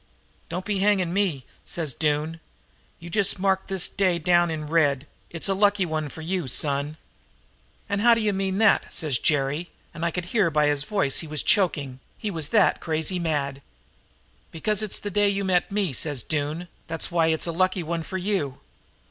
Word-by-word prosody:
"Don't 180 +3 -4
be 205 -2 -1
hanging 190 -3 +2
me,' 180 -10 0 0.2
says 155 -6 -3
Doone. 155 +2 -1 0.6
'You 170 +1 -10
just 200 0 +3
mark 190 0 +1
this 190 -2 0
day 185 -4 +1
down 175 +1 +3
in 155 -1 -4
red 145 -3 +2 0.2
it's 165 +2 -5
a 195 - +2
lucky 200 0 +3
one 155 -2 -2
for 160 - -9
you, 175 -1 -2
son.' 145 +3 0 0.9
"'An' 200 0 -1
how 235 +2 +6
d'you 215 -2 +1
mean 190 0 -1
that?' 220 -1 +3
says 150 -7 0
Jerry, 150 +3 0 0.2
and 165 - -6
I 170 - +2
could 175 +1 -4
hear 195 -1 +2
by 150 -1 +2
his 145 -1 0
voice 195 -9 0
that - - 0
he 165 - -8
was 150 -1 -2
choking, 145 -10 +2 0.2
he 210 - -3
was 160 -5 -2
that 210 -5 +3
crazy 160 +3 -1
mad. 140 -5 -2 0.9
"'Because 210 +5 0
it's 215 -2 +1
the 205 - -5
day 205 +1 +3
you 200 0 -1
met 180 -1 +1
me,' 195 -7 0
says 140 -2 -2
Doone; 155 +3 -2 0.2
'that's 165 +2 -2
why 165 -1 +3
it's 160 -1 +1
a 170 - -2
lucky 185 +1 +1
one 165 +1 -2
for 190 +4 -5
you.' 185 -8 -2
170 Hz, 190 wpm, -25 LUFS, 155-195 Hz, 0.9 s, how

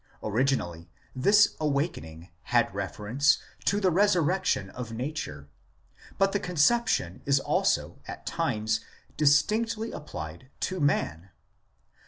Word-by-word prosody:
Originally 105 -8 -1 0.3
this 205 +11 +4
"awakening" 115 - -2 0.2
had 120 -5 +2
reference 105 - +1 0.3
to 200 - +2
the 190 -3 +2
"resurrection" 180 - +2
of 125 -3 -7
nature, 115 - -5 0.7
but 195 0 +3
the 200 - 0
conception 180 - +1
is 140 0 +4
also - - 0
at - - -8
times 110 +1 -1 0.4
distinctly 215 +10 +2
applied 85 - -8
to 185 0 -2
man. 90 - 0
140 Hz, 105 wpm, -28 LUFS, -, 0.7 s, this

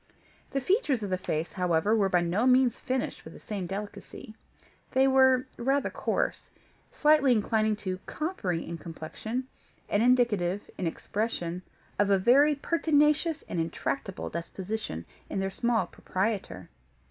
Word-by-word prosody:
The 275 - -1
features 290 - +1
of 200 - -4
the 185 - +1
face, 160 -2 -3
however, 180 +3 +2
were 200 -3 +2
by 180 -2 +3
no 180 +8 +1
means 255 -2 +5
finished 260 -1 -3
with - - -11
the - - -11
same 200 -4 -5
delicacy; 205 +4 -7 0.6
they 265 +1 +4
were 260 -1 +5
rather 270 +4 +1
coarse, - - -2 0.4
slightly 300 -3 +4
inclining 215 -1 +1
to 185 0 -2
coppery 200 - -2
in 170 -1 -5
complexion, 215 +10 -5 0.4
and 205 - +1
indicative, 215 -6 +2
in 180 - -2
expression, 180 -1 -3 0.4
of 205 -1 +3
a 200 - +5
very 275 +9 +5
pertinacious 305 +1 +2
and 170 - -4
intractable 180 +5 -3
disposition 180 - -5 0.2
in - - -2
their 195 0 -1
small 235 +2 +1
proprietor. 190 - -3
215 Hz, 140 wpm, -28 LUFS, 185-260 Hz, 0.6 s, means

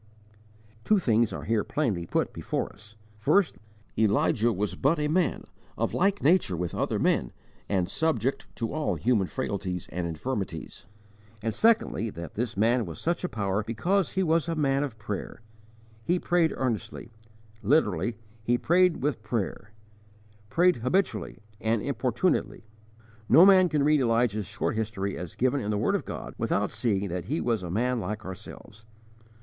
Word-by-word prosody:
Two 215 - +4
things 115 - +2
are - - -5
here 110 -1 +1
plainly 100 - -1
put - - 0
before - - -3
us: 105 +1 -16 0.2
first, 110 - +2 0.4
that - - 0
Elijah 110 +2 +3
was 105 0 -2
but 145 +5 +2
a 150 0 0
man, 160 0 +1 0.3
of - - -1
like 200 +2 +1
nature 155 - +3
with 85 -1 -3
other - - -1
men - - +1 0.4
and 95 -3 +1
subject 135 -5 -1
to 115 +1 -3
all 155 0 0
human 110 -6 +1
frailties 95 -8 -3
and 90 0 -2
infirmities; 85 -1 -5 0.6
and, 110 -1 -1
secondly, 225 - +2
that 85 -4 -8
this 120 0 -3
man 115 +1 +2
was 80 - -7
such 170 +2 -1
a 180 - -1
power 100 -1 -1
because 175 - 0
he 190 - +1
was 165 -1 +2
a 165 - -1
man 140 -3 +1
of 140 -6 -4
prayer: 105 0 -5 0.6
he 175 +9 +1
prayed 175 -2 +2
earnestly; 120 -2 -3 0.5
literally 120 -2 +2 0.2
"he 120 +2 +1
prayed 175 +1 +3
with 140 -6 0
prayer"; 110 -2 -3 0.8
prayed 180 +1 +3
habitually 175 - -1 0.2
and 110 0 +1
importunately. 130 0 0 0.6
No 160 +9 +8
man 190 -2 +6
can 150 -2 +1
read 150 0 +4
Elijah's 115 -4 +1
short - - -2
history 105 -3 -2
as 90 -1 -7
given 130 +2 +1
in 105 - -3
the 105 - 0
word - - +1
of - - -1
God, - - -6
without - - 0
seeing 100 -4 0
that 90 0 -4
he 150 +7 -1
was 115 -4 0
a 90 - -6
man 120 +6 0
like 105 +2 -4
ourselves. 105 +3 -10
115 Hz, 165 wpm, -27 LUFS, 105-155 Hz, 0.8 s, No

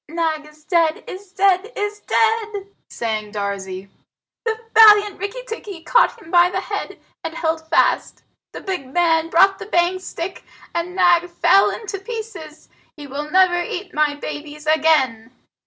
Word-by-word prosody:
"Nag 320 -2 -2
is 305 0 -19
dead 330 -1 +1
is 375 0 -10
dead 390 +2 +2
is 415 -1 -3
dead!" 435 -3 0 0.2
sang 215 -2 -4
Darzee. 200 -2 -5 0.6
"The 445 -1 -1
valiant 420 -3 +7
Rikki 405 +6 -5
tikki 405 -7 -7
caught 485 +4 +3
him 335 -6 -14
by 350 0 +5
the 375 +1 -2
head - - -5 0.2
and 325 0 -5
held 320 -1 -2
fast. - - +1 0.3
The - - -9
big 360 -10 -5
man 330 0 +2
brought 385 +4 +4
the - - -8
bang 350 -1 +1
stick, 370 0 -6 0.3
and 340 +2 -3
Nag 355 -1 +3
fell 385 +3 +4
in 450 - -6
two 395 -1 -5
pieces! 395 -8 -8 0.3
He 295 - -9
will 285 +2 -6
never 360 0 +3
eat 360 +2 -6
my 300 -1 +1
babies 295 +1 -8
again." 300 -7 +2
345 Hz, 155 wpm, -20 LUFS, 305-395 Hz, 0.6 s, valiant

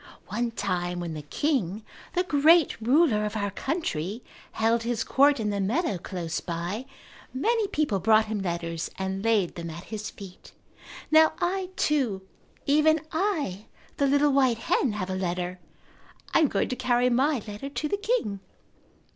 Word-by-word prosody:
One 240 0 -1
time 180 -5 -2
when 170 -2 -4
the 155 - -5
king, 215 - -1 0.3
the 360 - +3
great 315 -4 +4
ruler 245 -2 +3
of 210 0 -3
our 200 -1 -1
country, 205 - -3 0.3
held 225 +1 +2
his 230 -1 -1
court 280 +2 +4
in 210 -2 -1
the 200 - -2
meadow 210 - 0
close 170 -2 -4
by, 175 +8 -4 0.5
many 440 - +1
people 295 - 0
brought 220 +3 +4
him 215 -2 -3
letters 170 -2 -3
and 190 +1 -3
laid 215 -6 +2
them 170 -1 -6
at 165 +2 -8
his 215 0 -4
feet. 195 -3 -12 0.6
Now 315 0 +6
I, 365 +1 -1
too, 250 - 0 0.4
even 305 +2 +4
I, 310 - -1 0.3
the 280 - +2
little 285 +1 +3
white 260 -4 +3
hen, 230 +1 +1
have 190 -2 -3
a - - -1
letter. 180 0 -3 0.7
I - - +5
am 315 - +5
going - - -1
to 255 - -2
carry 245 0 +2
my 260 0 +2
letter 210 +7 -6
to 300 +2 -3
the 405 - -1
king." 410 - -1
225 Hz, 165 wpm, -26 LUFS, 190-290 Hz, 0.7 s, Now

